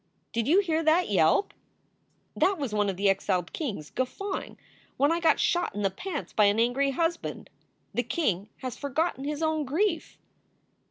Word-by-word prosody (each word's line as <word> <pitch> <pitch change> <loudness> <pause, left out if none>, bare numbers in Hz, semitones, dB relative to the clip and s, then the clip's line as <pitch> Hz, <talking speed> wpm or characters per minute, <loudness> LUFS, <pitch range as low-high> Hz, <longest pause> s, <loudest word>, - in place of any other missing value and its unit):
Did 230 -1 0
you 360 +7 +5
hear 325 -4 0
that 320 -2 +3
yelp? 180 - +3 0.8
That 390 0 +2
was 275 -8 -3
one 205 -1 +2
of 190 - -3
the 200 +1 +2
exiled 190 -2 0
kings 210 - -4
guffawing 385 +10 -4 0.4
when 285 +3 +3
I 335 - +1
got 325 -2 +3
shot 350 - +1
in 205 - -2
the 195 - +2
pants 310 - -5
by 210 - +4
an 205 +2 +3
angry 250 +4 +2
husband. 330 +5 -2 0.4
The 245 - +1
king 215 - -1
has 255 -2 -3
forgotten 285 0 -1
his 300 +2 -2
own 315 -1 +1
grief." 325 +5 -1
280 Hz, 170 wpm, -28 LUFS, 210-330 Hz, 0.8 s, you